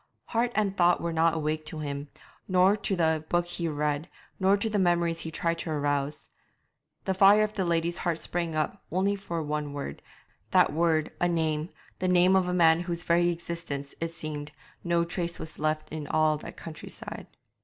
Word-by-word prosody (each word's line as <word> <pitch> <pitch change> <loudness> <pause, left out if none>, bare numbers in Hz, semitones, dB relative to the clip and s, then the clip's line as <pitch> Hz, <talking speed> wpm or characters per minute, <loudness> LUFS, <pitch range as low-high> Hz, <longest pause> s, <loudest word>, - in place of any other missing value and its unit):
Heart 235 +1 +1
and 205 -2 +1
thought 175 -1 +4
were 170 -1 -2
not 165 0 +3
awake 155 0 -1
to 155 - -6
him, 145 -1 -4 0.4
nor 185 +2 +4
to 200 -2 -1
the 160 -3 +1
book 175 0 +2
he 175 -1 -3
read, 150 +1 -1 0.3
nor 195 +1 +4
to 205 - -1
the 210 -2 0
memories 170 -2 +2
he 160 - -4
tried 165 +1 -1
to - - -4
arouse. 145 -1 -1 0.8
The 190 - +1
fire 200 +3 +6
of 215 0 -2
the 190 -3 -1
lady's 170 0 0
heart 170 -3 0
sprang 170 0 -2
up 155 -1 -1
only 190 +4 +1
for 170 -5 -4
one 150 -1 -3
word, 140 - -5 0.5
that - - +4
word 160 -1 +2
a 175 - +3
name, 160 -1 0 0.3
the 185 - 0
name 180 +1 +5
of 185 -1 +3
a - - 0
man 165 -2 +5
of 175 - -4
whose 170 0 -2
very 175 0 +3
existence, 170 -5 -5
it 165 - -1
seemed, 155 -2 -6 0.3
no 170 -1 +2
trace 170 0 -2
was 160 - -8
left 155 0 -1
in 155 -2 -5
all 155 0 +3
that - - -10
country 160 -2 -8
side. - - -8
170 Hz, 195 wpm, -28 LUFS, 155-180 Hz, 0.8 s, fire